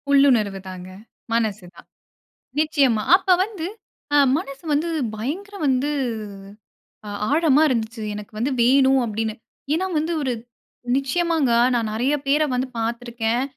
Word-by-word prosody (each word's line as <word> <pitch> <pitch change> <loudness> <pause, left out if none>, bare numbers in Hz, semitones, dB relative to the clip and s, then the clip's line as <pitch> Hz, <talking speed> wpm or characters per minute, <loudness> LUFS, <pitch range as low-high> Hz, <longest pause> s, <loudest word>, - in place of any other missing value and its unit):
உள்ளுணர்வு 245 -9 +4
தாங்க. 185 0 -9 0.4
மனசு 215 -4 0
தான். - - -16 0.7
நிச்சயமா. 280 -8 +2
அப்ப 375 -1 +3
வந்து, 395 -6 -6 0.5
அ - - +6 0.2
மனசு 275 -3 -8
வந்து 310 +4 0 0.3
பயங்கர 345 - -5
வந்து 265 +2 +1 1.2
அ - - -5 0.2
ஆழமா 305 -2 +4
இருந்துச்சு. 225 -2 -2
எனக்கு 205 0 -8
வந்து 245 +6 0
வேணும் 265 +2 +4
அப்டின்னு! 220 0 -2 0.4
ஏன்னா 350 +4 0
வந்து 320 +3 -1
ஒரு 265 -3 -1 0.6
நிச்சயமாங்க. 305 0 +1 0.2
நான் 230 -2 0
நிறையா 260 +7 +1
பேர 295 +3 +3
வந்து 250 +1 -1
பாத்துருக்கேன். 235 +1 -1
260 Hz, 125 wpm, -22 LUFS, 225-300 Hz, 1.2 s, அ